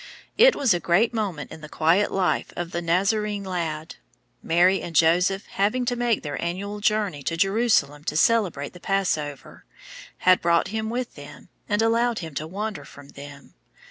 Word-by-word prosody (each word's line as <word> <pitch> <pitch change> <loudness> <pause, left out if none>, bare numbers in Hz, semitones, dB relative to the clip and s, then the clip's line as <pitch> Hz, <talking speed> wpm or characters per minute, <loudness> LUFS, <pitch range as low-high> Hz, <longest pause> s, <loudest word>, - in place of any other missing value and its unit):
It - - +6
was 260 -8 +2
a 175 - 0
great 195 +8 +2
moment 195 -10 -3
in 160 - -10
the 155 - -10
quiet 170 +8 +2
life 190 -2 0
of 175 -1 -5
the 170 - -3
Nazarene 200 +4 0
lad. 165 -4 -4 0.4
Mary 180 +3 +3
and 170 - -7
Joseph 180 +5 +3
having 210 +6 -1
to 245 0 0
make 240 -3 0
their 145 -2 -5
annual 200 +4 -4
journey 205 -8 0
to 165 +4 -3
Jerusalem 195 -7 +1
to 150 - -2
celebrate 180 -8 +1
the 180 - -12
Passover, 160 -8 -2 0.5
had 185 0 +4
brought 170 0 +2
him 220 +1 -3
with 245 +1 -4
them, - - -13 0.2
and 210 +1 +1
allowed 230 +1 +1
him 160 -3 -6
to 155 +3 -4
wander 205 +4 -5
from 140 0 -14
them. 140 0 -12
185 Hz, 175 wpm, -24 LUFS, 165-215 Hz, 0.5 s, It